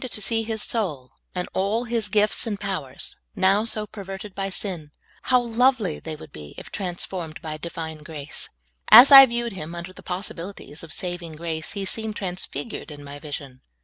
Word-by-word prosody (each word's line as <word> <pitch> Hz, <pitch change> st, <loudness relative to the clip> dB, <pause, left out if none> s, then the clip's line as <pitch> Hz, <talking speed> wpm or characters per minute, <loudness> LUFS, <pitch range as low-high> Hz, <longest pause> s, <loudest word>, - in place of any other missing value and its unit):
to 220 Hz, -, -1 dB
see 225 Hz, +2 st, +2 dB
his 220 Hz, -1 st, -3 dB
soul 150 Hz, -, -2 dB, 0.2 s
and 180 Hz, 0 st, -2 dB
all 205 Hz, +5 st, 0 dB
his 230 Hz, -3 st, 0 dB
gifts 210 Hz, +3 st, +2 dB
and 205 Hz, -3 st, -2 dB
powers, 185 Hz, -10 st, -4 dB, 0.2 s
now 195 Hz, +1 st, +4 dB
so 220 Hz, -2 st, 0 dB
pen 205 Hz, -1 st, -9 dB
erted 195 Hz, +1 st, -7 dB
by 195 Hz, 0 st, -2 dB
sin 180 Hz, -6 st, -3 dB, 0.2 s
— -, -, -30 dB
how 255 Hz, -1 st, +6 dB
lovely 240 Hz, -, +2 dB
they 160 Hz, -1 st, -6 dB
would 155 Hz, -1 st, -12 dB
be 75 Hz, -1 st, -11 dB
if -, -, -10 dB
trans 180 Hz, -3 st, -3 dB
formed 165 Hz, -4 st, -6 dB
by 155 Hz, -1 st, -3 dB
Divine 160 Hz, 0 st, -6 dB
grace! 150 Hz, -2 st, -5 dB, 0.4 s
As 245 Hz, +6 st, +11 dB
I 270 Hz, -1 st, +13 dB
viewed 235 Hz, -2 st, -2 dB
him 170 Hz, -2 st, -6 dB
under 175 Hz, +2 st, -7 dB
the -, -, -13 dB
possibilities 180 Hz, -4 st, -5 dB
of 165 Hz, -, -9 dB
vSaving 175 Hz, -2 st, -4 dB
grace, 160 Hz, -1 st, -3 dB
he 200 Hz, -1 st, -3 dB
seemed 220 Hz, +2 st, -2 dB
transfigured 190 Hz, +3 st, -5 dB
in 145 Hz, -1 st, -9 dB
my 145 Hz, 0 st, -8 dB
vision. 140 Hz, -3 st, -7 dB
190 Hz, 190 wpm, -24 LUFS, 160-215 Hz, 0.4 s, I